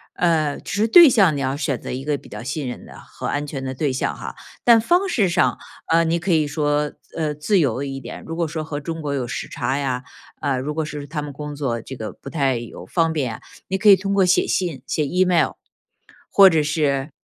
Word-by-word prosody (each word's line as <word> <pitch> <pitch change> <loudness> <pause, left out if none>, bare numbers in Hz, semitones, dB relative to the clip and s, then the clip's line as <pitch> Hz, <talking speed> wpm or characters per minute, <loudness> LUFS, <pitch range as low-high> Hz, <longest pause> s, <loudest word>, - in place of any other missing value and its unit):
呃， 160 -4 +1
只 - - -8
是 220 - +3
对 340 +8 +9
象 195 - +4
你 - - -2
要 135 0 -1
选 140 -4 -2
择 - - -7
一 130 +2 -4
个 145 0 0
比 - - -15
较 - - -8
信 140 +3 -4
任 125 - -6
的 - - -12
和 - - -8
安 145 0 -1
全 140 -2 -6
的 130 0 -4
对 140 0 -1
象 130 - -2
哈， - - -7 0.3
但 235 -2 +6
方 355 - +2
式 215 - +2
上， 175 +1 +1 0.3
呃， 165 +1 +5
你 165 +1 +1
可 175 +3 -2
以 155 -2 +2
说， 145 0 0 0.2
呃， 155 -2 -1
自 185 +7 +1
由 135 -4 0
一 135 -1 -5
点， - - -9
如 165 - -5
果 170 -1 0
说 155 0 -4
和 150 -2 -5
中 165 +2 -5
国 145 -2 -3
有 130 -3 -2
时 - - -4
差 135 - -2
呀， 130 -3 -2 0.4
呃， 140 -2 0
如 140 +4 -3
果 160 +1 -1
是 150 -1 -6
他 150 +1 -4
们 145 0 -6
工 150 +1 -7
作 135 -5 -2
这 135 - -8
个 110 -3 -6
不 - - -11
太 135 -6 +1
有 120 0 -8
方 165 -2 +1
便 130 -8 -2
啊， - - -13 0.3
你 190 - -1
可 210 +2 0
以 200 - +10
通 195 +1 -3
过 195 -2 +4
写 180 - +3
信、 170 -8 -1
写 155 - 0
Email， 180 +3 +2 0.8
或 195 -1 +8
者 160 -3 +2
是 145 -2 0
150 Hz, 275 characters per minute, -22 LUFS, 140-170 Hz, 0.8 s, 以